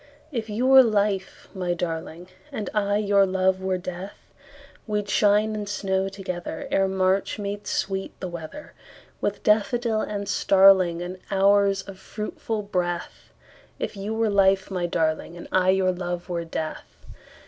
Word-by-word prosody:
If 225 -5 -4
you 220 +4 -1
were 265 0 +9
life, 205 -4 0
my 180 -3 -2
darling, 170 +1 -5 0.2
And 215 -7 -4
I 205 -1 +1
your 200 -1 +3
love 190 0 +1
were 190 -1 0
death, 180 +2 -7 0.7
We'd 210 -1 -1
shine 210 +2 +3
and 210 -1 -4
snow 190 -1 -1
togetherEre 190 -1 -2
March 190 +2 +1
made 205 0 -5
sweet 195 0 -3
the 185 - -4
weatherWith 175 - -7
daffodil 220 +1 +2
and 200 -1 -3
starlingAnd 185 -2 +4
hours 195 0 +3
of 195 -1 -11
fruitful 215 +1 -5
breath; 175 -3 -3 0.5
If - - -4
you 205 +3 -4
were 225 -1 +1
life, 195 -1 +3
my 180 -2 -1
darling, 160 +1 -1
And 175 - -9
I 185 0 +3
your 190 -1 +3
love 175 0 -5
were 170 -1 -2
death. 160 -1 -6
195 Hz, 140 wpm, -25 LUFS, 180-205 Hz, 0.7 s, were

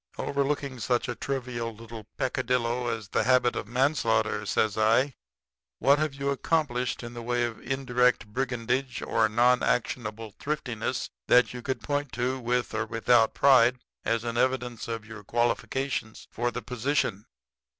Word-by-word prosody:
"'Overlooking 140 -2 -1
such 120 +3 0
a 120 - -2
trivial 120 -3 -4
little 115 -1 -10
peccadillo 125 -2 0
as 115 -3 -3
the - - +1
habit 125 0 +3
of - - -4
manslaughter,' 115 -5 +1
says 110 0 +1
I, 115 +6 +3 0.6
'what 140 +4 +4
have 155 -3 -1
you 140 0 -1
accomplished 135 -5 0
in 120 0 -7
the 120 - -6
way 120 +1 0
of 120 -2 -3
indirect 125 -1 +1
brigandage 125 +2 -2
or 110 -1 +2
nonactionable 115 -2 +1
thriftiness 140 -7 -3 0.2
that 125 0 +5
you 125 - -6
could 130 +2 -3
point 145 -2 -2
to, 125 +2 -1
with 125 0 -1
or - - -1
without 115 0 +3
pride, 125 -3 +5 0.3
as 115 0 0
an 120 0 -3
evidence 125 -3 0
of 115 -2 -4
your 110 -2 -10
qualifications 120 +1 -1
for 120 +1 -1
the - - -6
position?' 125 -5 -1
120 Hz, 150 wpm, -27 LUFS, 115-130 Hz, 0.6 s, that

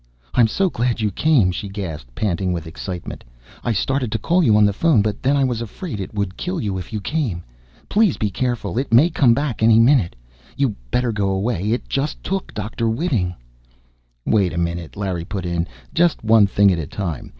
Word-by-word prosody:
"I'm 120 -2 +5
so 190 - +1
glad 120 0 -1
you 105 -2 0
came!" 125 -6 +3
she 100 +2 -5
gasped, 80 -12 -6
panting 95 -3 -1
with 85 -1 -4
excitement. 85 +2 -7 0.4
"I 120 - 0
started 125 +3 0
to 110 - 0
call 170 - +2
you 110 -7 +5
on 105 - +6
the 100 - +2
phone, 130 -2 +3
but 105 -1 -2
then 140 +2 +2
I 140 - +3
was 120 -3 -1
afraid 115 - -6
it 95 - -5
would 100 -3 -3
kill 180 0 -3
you 100 -3 -2
if 90 - -9
you 110 - -2
came! 105 - -2 0.4
Please 210 -5 +2
be 105 -2 -1
careful! 120 0 -2
It 135 - -3
may 140 +10 +6
come 125 -7 +4
back, 140 -5 -2
any 110 0 +6
minute! 115 - +4 0.4
You'd 135 -5 +1 0.2
better 125 -1 +1
go 100 -2 0
away! 95 0 -1
It 120 - -2
just 140 +2 -2
took 195 0 -3
Dr. 110 +2 -2
Whiting!" 110 - -1 0.9
"Wait 100 -5 +2
a - - -4
minute," 85 -1 -3
Larry 95 -4 -2
put 95 0 -5
in. 85 0 -1 0.3
"Just 170 -5 +2
one 110 -2 +5
thing 100 0 +4
at 85 - 0
a 75 - -4
time. 85 -8 -4
110 Hz, 205 wpm, -21 LUFS, 95-130 Hz, 0.9 s, on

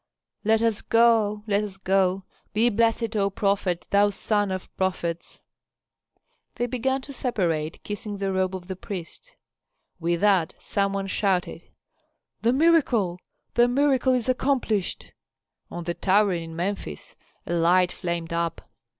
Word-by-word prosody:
"Let 220 +1 +3
us 225 -2 +1
go! 225 -3 +3
Let 205 -1 +1
us 200 -2 -6
go! 190 -1 +1 0.3
Be 225 +3 +3
blessed, 230 +1 +1
O 200 -1 +2
prophet, 195 -3 0
thou 205 +1 +5
son 205 0 0
of 185 -1 -6
prophets!" 175 -3 -3 1.1
They 240 - -1
began 260 +2 -1
to 280 - -9
separate, 170 - -2
kissing 205 0 -5
the 195 -1 -1
robe 190 0 0
of 180 -1 -7
the 190 - -4
priest. 190 - -8 0.6
With 170 0 0
that 195 -6 +3
some 200 -1 -1
one 195 0 -2
shouted, 190 -2 -1 0.8
"The 230 - +3
miracle, 255 - +3 0.3
the 240 0 +5
miracle 265 0 +2
is 245 -2 -1
accomplished." 255 -6 -1 0.6
On 175 - -6
the 170 0 -2
tower 200 +2 +3
in 165 -1 -5
Memphis 175 - -4 0.3
a - - -3
light 175 +2 +3
flamed 170 -2 -4
up. 170 -1 -2
200 Hz, 140 wpm, -25 LUFS, 180-230 Hz, 1.1 s, thou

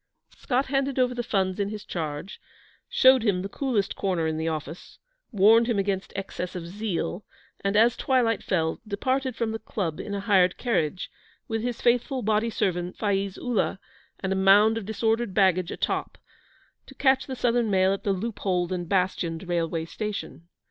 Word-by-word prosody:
Scott 265 0 0
handed 270 0 -1
over 250 -1 +2
the 245 - -2
funds 190 -4 -1
in 200 0 0
his 210 -1 -7
charge, 155 +2 -5 0.5
showed 260 - +6
him 195 -5 +1
the - - -3
coolest 215 -3 -1
corner 180 -4 -1
in 160 0 -1
the 160 +1 -2
office, 160 +1 -5 0.3
warned 220 +3 +5
him 235 -4 +1
against 195 -1 -1
excess 190 -2 -5
of 175 -2 -5
zeal, 195 0 -3 0.4
and, 200 +1 0
as 225 +2 +5
twilight 240 -5 +1
fell, 160 -4 -1
departed 255 +4 -1
from 230 -2 -1
the 220 - -4
Club 170 -9 -4
in 200 - -4
a - - -2
hired 190 -3 +3
carriage, 185 -8 -1 0.4
with 225 -1 -2
his 245 0 -3
faithful 245 +2 +2
body 215 +2 +1
servant, 180 -5 -2
Faiz 200 -2 -1
Ullah, 240 -6 -1 0.4
and 190 0 -1
a - - -1
mound 200 +3 +5
of 225 -4 -5
disordered 225 -1 0
baggage 185 -3 +3
atop, - - -2 0.7
to - - -13
catch 265 -1 +2
the 265 - -4
Southern 240 -2 +1
Mail 190 -1 +3
at 195 - -5
the 200 - +1
loopholed 190 -3 -1
and 175 -2 -3
bastioned 180 -2 -1
railway 165 -2 -1
station. 200 -3 -6
200 Hz, 175 wpm, -26 LUFS, 185-230 Hz, 0.7 s, showed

